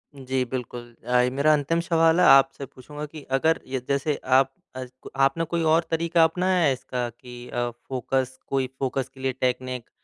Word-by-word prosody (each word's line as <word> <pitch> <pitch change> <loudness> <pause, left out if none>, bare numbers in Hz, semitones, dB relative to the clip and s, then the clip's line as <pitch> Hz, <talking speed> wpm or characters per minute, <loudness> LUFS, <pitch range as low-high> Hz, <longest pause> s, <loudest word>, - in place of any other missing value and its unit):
जी, 130 -1 -2
बिल्कुल। 120 -1 -6
अ, 125 0 +3
मेरा 145 +3 +3
अंतिम 150 +3 +1
सवाल 165 0 +3
है 180 - +5
आपसे 135 0 +5
पूछूँगा 145 +4 -9
कि 150 0 -11
अगर 160 +4 +2
य 130 0 -2
जैसे 140 +2 0
आप 130 +1 +4 0.2
अ, 130 0 -5 0.4
आपने 135 +4 +3
कोई 170 +1 -2
और 165 +1 +4
तरीका 165 +1 +3
अपनाया 180 +3 +2
है 145 - +4
इसका 125 -1 -4
कि 120 +1 -12
अ, 120 0 -1
फ़ोकस 130 +2 -3
कोई 135 -1 0
फ़ोकस 135 0 -2
के 135 - -16
लिए 130 0 0
टेक्निक 125 -1 -2
135 Hz, 180 wpm, -25 LUFS, 125-155 Hz, 0.4 s, है